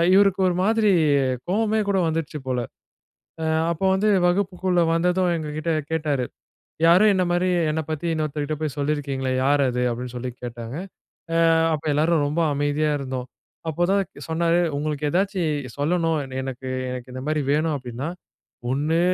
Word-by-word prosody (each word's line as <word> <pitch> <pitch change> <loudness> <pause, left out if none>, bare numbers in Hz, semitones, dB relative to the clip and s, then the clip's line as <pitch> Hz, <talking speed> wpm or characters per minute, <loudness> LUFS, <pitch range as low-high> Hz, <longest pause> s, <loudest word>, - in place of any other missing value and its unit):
இவருக்கு 195 -1 +4
ஒரு 175 - -1
மாதிரி 220 -1 +3 0.6
கோவமே 220 +2 +1
கூட 195 - +2
வந்துருச்சு 155 -2 -2
போல, 125 -1 0 0.8
அ - - -1 0.3
அப்போ 170 +4 -2
வந்து 210 +2 +2 0.2
வகுப்புக்குள்ள 185 -1 +1
வந்ததும், 180 +1 +2
எங்க 155 -2 -4
கிட்டே 165 +1 -1 0.2
கேட்டாரு. 150 -5 0 0.6
"யாரோ 175 +5 +6
என்ன 185 - +2
மாதிரி, 180 +1 +1 0.2
என்ன 160 - 0
பத்தி, 155 +2 -3
இன்னொருத்தர்கிட்ட 155 -1 -2
போய் 150 -3 -3
சொல்லிருக்கீங்களே? 140 -3 -1
யாரு 140 +1 +3
அது?" 125 0 -1
அப்டீன்னு 125 +1 -5
சொல்லி 125 +1 -4
கேட்டாங்க. 120 +2 -6 0.6
அ - - +3 0.4
அப்போ, 155 +1 -5
எல்லாரும் 155 0 +2
ரொம்ப 155 +4 -1
அமைதியா 145 +2 +1
இருந்தோம். 130 -2 -5 0.4
அப்போதான் 180 +5 +2 0.3
சொன்னாரு, 170 +1 +2 0.2
"உங்களுக்கு 150 0 -2
எதாச்சும் 160 - -1
சொல்லணும், 165 +1 +1 0.2
எனக்கு 130 0 -6 0.2
எனக்கு 125 0 -6
இந்த 130 - -5
மாரி 155 -1 +1
வேணும், 155 +1 +1
அப்டீன்னா 125 +3 -5 0.6
ஒண்ணு 155 +5 +1
155 Hz, 145 wpm, -23 LUFS, 140-175 Hz, 0.8 s, யாரோ